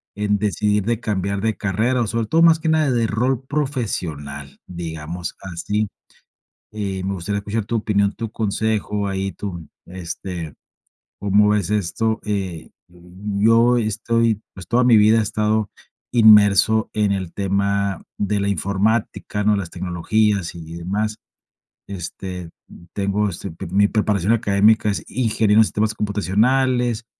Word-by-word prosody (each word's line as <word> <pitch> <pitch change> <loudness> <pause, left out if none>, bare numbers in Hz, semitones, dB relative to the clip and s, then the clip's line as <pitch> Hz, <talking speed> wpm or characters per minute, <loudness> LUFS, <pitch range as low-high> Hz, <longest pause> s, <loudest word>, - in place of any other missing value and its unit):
en 105 0 0
decidir 105 +1 +1
de 115 -1 0
cambiar 100 -3 -2
de 110 +1 0
carrera. 115 +5 0
Sobre 115 +1 -1
todo, 165 +8 +2
más 165 -1 +6
que 160 - -1
nada, 155 -3 +2
de 115 -2 +1
rol 125 +4 0
profesional, 90 - -4
digamos 85 -1 -6 0.2
así. 105 +6 -1 0.8
Eh, 100 -3 -4
me 95 - -2
gustaría 100 +3 -3
escuchar 105 +1 -3
tu 115 - -3
opinión, 100 -2 +1
tu 115 -1 -5
consejo. 105 -1 -1
Ahí 95 0 -2
tu, 85 -6 -7 0.2
este, 85 -2 -6 0.7
cómo 100 +1 +3
ves 105 -3 0
esto. 110 +3 0
Eh, 95 -6 -4 0.2
yo 105 +7 +1
estoy, 115 0 0
pues, 95 -3 -10
toda 125 +1 +3
mi 120 -2 +6
vida 110 +2 +5
he - - +3
estado 105 0 0 0.4
inmerso, 110 -1 +5
en 105 -2 +1
el 95 -3 -3
tema 100 0 0 0.2
de 105 0 0
la 100 - 0
informática, 100 +2 -1
¿no? 105 0 +3
Las 95 -4 -4
tecnologías, 95 +2 0
y 85 - -9
y - - -7
demás. 105 +5 -2 0.7
Este, 90 -1 -6 0.2
m 85 - -15
tengo, 100 +1 0
este, 85 - -7
pi 80 - -8
mi 100 +4 +3
preparación 105 -1 +1
académica, 105 -1 +3
es 100 - -2
Ingeniero 110 -3 +2
en - - +7
Sistemas 105 +1 -1
Computacionales. 115 +4 +1
105 Hz, 145 wpm, -21 LUFS, 95-110 Hz, 0.8 s, en